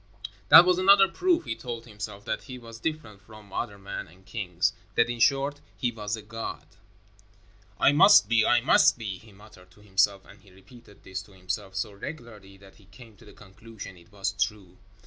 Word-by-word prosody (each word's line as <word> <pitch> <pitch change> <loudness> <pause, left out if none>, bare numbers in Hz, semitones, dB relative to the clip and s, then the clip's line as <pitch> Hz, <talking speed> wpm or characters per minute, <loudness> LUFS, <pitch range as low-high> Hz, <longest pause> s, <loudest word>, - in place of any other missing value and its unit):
That 175 - +10
was 180 0 +2
another 195 +1 +6
proof, 345 - 0
he - - -3
told 120 -2 -7
himself, 105 -2 -8
that - - -4
he 130 -2 -8
was 115 -2 -12
different 145 -9 -5
from 105 -1 -16
other 100 - -4
men 100 0 -7
and 90 +4 -21
kings 90 -5 -2 0.2
that, 120 0 +2
in 120 - -6
short, 140 +3 +1 0.2
he 120 - -1
was 105 -1 -4
a 110 - -11
god. 115 +2 -7 1.1
"I - - +5
must 175 - +7
be, 115 0 +3
I 120 +1 +3
must 125 - +4
be," 100 -6 -6
he 110 - -18
muttered 95 -2 -18
to 95 +3 -22
himself, 100 -1 +1
and 100 - -17
he 100 - -21
repeated 100 +3 -18
this 95 +1 -6
to 100 0 -18
himself 95 +1 -6
so 100 +2 -3
regularly 105 -4 -10
that 95 0 -18
he 100 - -21
came 110 +3 -16
to 115 - -18
the 105 - -15
conclusion 105 0 -12
it 85 0 -20
was 100 -2 -2
true. 100 -2 -4
105 Hz, 200 wpm, -26 LUFS, 95-120 Hz, 1.1 s, That